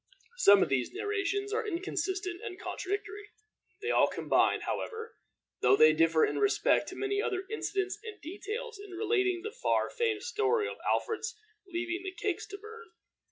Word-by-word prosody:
Some 200 - +7
of - - -2
these 135 -2 0
narrations 405 0 -1
are 445 0 -1
inconsistent 370 0 -2
and 405 -6 -6
contradictory. 410 +1 -4 0.5
They 455 - 0
all - - +5
combine, - - +2
however, 450 0 -4 0.5
though - - +6
they 155 0 +7
differ 165 0 +4
in - - -2
respect 410 -1 +3
to - - -8
many 405 0 0
other 385 -4 -1
incidents 390 -2 -2
and 440 -3 -8
details, 425 +7 -6
in 400 -2 -11
relating 380 -3 +1
the 440 - -4
far - - 0
famed 455 -4 0
story 430 -1 +1
of - - -6
Alfred's 455 0 -1 0.3
leaving 355 0 -3
the 380 -1 -5
cakes 380 -1 -2
to 400 - -7
burn. 445 +3 -11
405 Hz, 160 wpm, -31 LUFS, 370-440 Hz, 0.5 s, Some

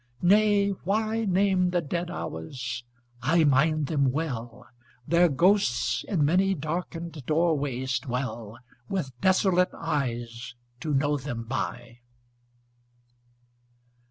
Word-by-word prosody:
Nay, 205 +1 +4
why 215 +4 -1
Name 190 -1 +2
the 175 0 +1
dead 170 +2 -3
hours? 125 - -5 0.4
I 160 +7 +3
mind 150 +2 +3
them 140 -3 +1
well: 125 -6 -4 0.4
Their 170 +1 +4
ghosts 170 -4 +2
in 165 -8 +1
many 190 +5 +3
darkened 165 0 -5
doorways 145 -6 0
dwell 120 -3 -4 0.3
With 180 -9 -2
desolate 185 -1 +3
eyes 120 -6 -3 0.2
to 150 +1 -1
know 145 +2 +2
them 125 -4 -5
by. 120 -1 -5
155 Hz, 100 wpm, -27 LUFS, 130-180 Hz, 0.4 s, Nay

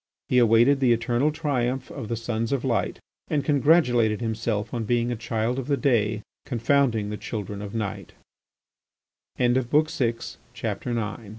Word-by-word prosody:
He 125 - +4
awaited 120 +4 +5
the 125 -3 +4
eternal 120 +5 +1
triumph 130 -4 -2
of 110 - -6
the 115 - -2
Sons 115 0 -3
of 140 -1 -1
Light 120 -3 0 0.3
and 145 -2 -1
congratulated 135 -7 +3
himself 110 -1 -2
on 120 -2 -2
being 120 +2 0
a - - -1
Child 115 +2 -2
of 130 - -5
the 140 -1 +1
Day 110 -7 +1 0.2
confounding 120 -3 +1
the 105 - -4
Children 105 -2 -5
of 105 +1 -7
Night. 105 -3 -4 1.2
X. 120 0 +2
MR. 120 -5 -2
120 Hz, 140 wpm, -25 LUFS, 110-130 Hz, 1.2 s, awaited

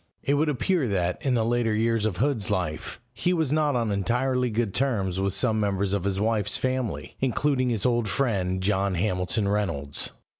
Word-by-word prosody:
It 140 - +1
would 150 +2 +2
appear 150 +2 +1
that, 90 -4 -1
in 130 -2 +1
the 115 -2 +1
later 115 -2 +1
years 115 0 +1
of 95 -5 -3
Hood's 125 -7 0
life, 75 0 -2
he 180 - 0
was 160 -6 0
not 150 -2 +2
on 115 -3 0
entirely 125 +5 0
good 110 -3 -1
terms 100 -9 0
with 100 0 0
some 110 -2 +1
members 100 -1 0
of 100 -2 -1
his 100 -1 0
wife's 105 -2 +1
family, 125 - -2
including 130 0 +1
his 115 -5 -1
old 120 -3 +1
friend 95 -7 0
John 100 -1 +1
Hamilton 90 +2 0
Reynolds. 85 -9 -1
110 Hz, 185 wpm, -26 LUFS, 95-125 Hz, -, would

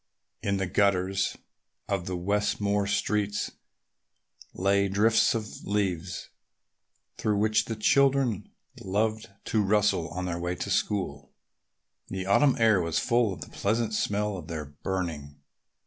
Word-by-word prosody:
In 100 0 0
the 95 - 0
gutters 95 0 +1 0.5
of 95 -3 -2
the 90 -1 -2
Westmore 100 +1 0
streets 105 0 0 1.0
lay 100 +1 +2
drifts 110 +5 +3
of 110 -2 -5
leaves 95 -3 -2 0.9
through 105 -1 +1
which 110 +1 +2
the 115 - -4
children 130 -2 +2 0.3
loved 110 +3 -1 0.2
to 110 - +1
rustle 105 -4 +2
on 90 +1 -4
their 85 -1 -3
way 90 +1 -2
to - - -4
school. 70 -9 -1 0.7
The 95 -1 -4
autumn 135 +8 +4
air 110 -5 +4
was 85 -1 -1
full 120 -3 +2
of 85 -5 -7
the - - -8
pleasant 110 +2 -1
smell 105 -1 0
of 80 -4 -9
their 80 -2 -4
burning. 75 -1 -4
100 Hz, 130 wpm, -28 LUFS, 90-105 Hz, 1.0 s, autumn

